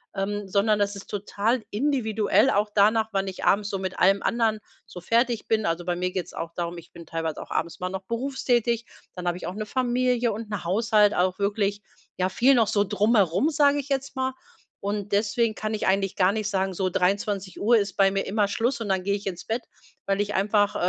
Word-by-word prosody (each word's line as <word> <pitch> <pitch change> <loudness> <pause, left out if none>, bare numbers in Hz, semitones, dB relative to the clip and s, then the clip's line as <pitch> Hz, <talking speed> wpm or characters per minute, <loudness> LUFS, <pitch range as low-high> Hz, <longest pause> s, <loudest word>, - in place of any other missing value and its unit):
ähm, 200 +1 -2
sondern 205 +2 +2
das 205 0 0
ist 200 - -9
total 210 +3 -1
individuell 225 -1 +2
auch 210 -1 +1
danach, 220 +2 +3
wann 195 0 0
ich 190 - -5
abends 205 +1 +3
so 195 - -2
mit 190 -1 -5
allem 195 +2 +4
anderen 225 -2 +1 0.3
so 180 - -9
fertig 230 +4 +1
bin. 220 -2 +1
Also, 170 +1 -2
bei 175 -1 0
mir 180 +1 -2
geht's 180 -2 -4
auch 165 0 -5
darum, 175 0 -3
ich 170 - -17
bin 170 - -12
teilweise 165 -2 -3
auch - - -9
abends 170 - -2
mal 180 - -2
noch 190 0 -5
berufstätig, 235 -1 0 0.3
dann 180 -1 -6
habe 175 0 0
ich - - -7
auch 180 - -4
'ne 210 +1 -5
Familie 250 -1 +1
und 215 0 -7
'n 200 -4 -3
Haushalt, 210 +3 +3
auch 185 +1 +1
wirklich 205 0 -1 0.3
ja 185 0 +1
viel 260 +7 +4
noch 225 -3 +3
so 205 - +2
drumherum, 205 - +2
sage 285 -1 +3
ich 285 0 -6
jetzt 275 0 -2
mal. 260 0 -1 0.5
Und 205 0 -3
deswegen 215 +2 +1
kann 215 0 -3
ich 210 - -2
eigentlich 195 0 +1
gar 190 +1 +4
nicht 215 -1 -2
sagen, 190 -2 -1
so 185 +1 -1
23:00 200 +4 +1
ist 200 -2 -1
bei 195 -1 +4
mir 195 0 -1
immer 205 0 +1
Schluss 235 +3 -1
und 210 - -4
dann 190 -1 +1
gehe 200 +1 +1
ich 205 - -7
ins 180 -2 -5
Bett, 230 +2 -2 0.4
weil 195 0 +1
ich 205 0 -1
einfach, 205 +1 +2
205 Hz, 220 wpm, -25 LUFS, 190-225 Hz, 0.5 s, allem